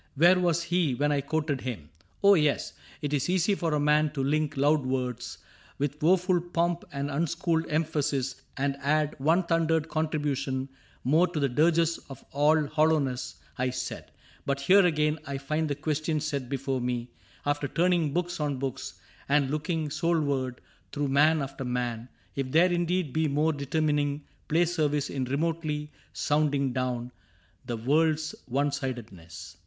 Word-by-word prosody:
Where 175 +5 +6
was 170 -2 +1
he 170 -5 +1
when 145 +3 +1
I 145 -1 +1
quoted 150 -1 -1
him? 90 - -6
— - - -36
oh, 200 0 +8
yes: 150 -6 +1 0.3
'T 145 0 0
is 140 +4 -1
easy 185 +2 +2
for 165 -5 0
a - - +1
man 150 +1 +3
to 135 -2 -1
link 150 +1 0
loud 145 +1 +3
words 125 -2 -3 0.4
With 145 +2 -2
woeful 180 +2 +3
pomp 175 0 -1
and 140 0 -3
unschooled 165 +2 0
emphasis 150 -4 -1 0.2
And 140 0 0
add 150 +1 +1
one 165 +7 +3
thundered 165 -2 +1
contribution 145 -4 -1 0.3
more 160 +8 +4
To 170 -3 -3
the 140 -1 +1
dirges 165 +5 +2
of 135 - -10
all 150 +2 +3
hollowness, 150 -4 +1 0.2
I 125 0 +1
said; 130 - -5 0.3
But 140 0 -1
here 190 +7 +6
again 150 -1 +1
I 140 -1 -3
find 155 +3 -1
the 145 - -1
question 155 +1 -1
set 140 -4 -3
Before 135 -1 -2
me, 120 0 -3 0.3
after 145 0 0
turning 170 -1 +2
books 175 +2 -2
on 145 -2 -1
books 135 -1 -4 0.3
And 140 -1 +3
looking 155 0 -1
soulward 145 -5 0 0.3
through 145 -1 -1
man 150 +2 +4
after 135 0 -6
man, 125 -1 -3 0.3
If 135 -2 -2
there 175 +4 +5
indeed 175 -3 0
be 160 0 +2
more 150 +3 +1
determining 145 0 0 0.2
Play 170 +3 +3
service 150 -4 0
in 130 -2 -2
remotely 150 +1 -2 0.2
sounding 145 -3 +1
down 125 -1 -2 0.6
The 120 - -2
world's 155 +5 +1
one 140 +3 +1
sidedness. 100 - -6
150 Hz, 160 wpm, -28 LUFS, 135-160 Hz, 0.6 s, oh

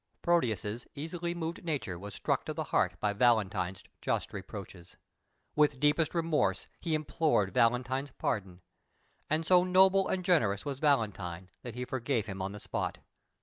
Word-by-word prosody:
Proteus's 115 - 0
easily 170 +3 -3
moved 165 0 -4
nature 140 - -2
was 100 +1 -8
struck - - 0
to - - -4
the - - -1
heart - - +2
by 105 -1 +1
Valentine's 100 -5 +2 0.2
just - - -1
reproaches. 95 -3 -9 0.6
With 150 -3 +3
deepest 150 +4 +2
remorse, 165 -2 +1
he 165 -2 0
implored 150 - +1
Valentine's 125 +4 +2
pardon, 95 -7 -3 0.7
and 155 +2 +1
so 180 +1 +6
noble 190 +1 +5
and 185 -1 -1
generous 115 - +2
was 140 -2 -3
Valentine 100 - 0
that 120 -2 -7
he 125 0 -3
forgave 125 -3 -1
him 95 -3 -5
on 95 +1 -2
the 105 - -8
spot. - - -3
125 Hz, 150 wpm, -31 LUFS, 100-160 Hz, 0.7 s, so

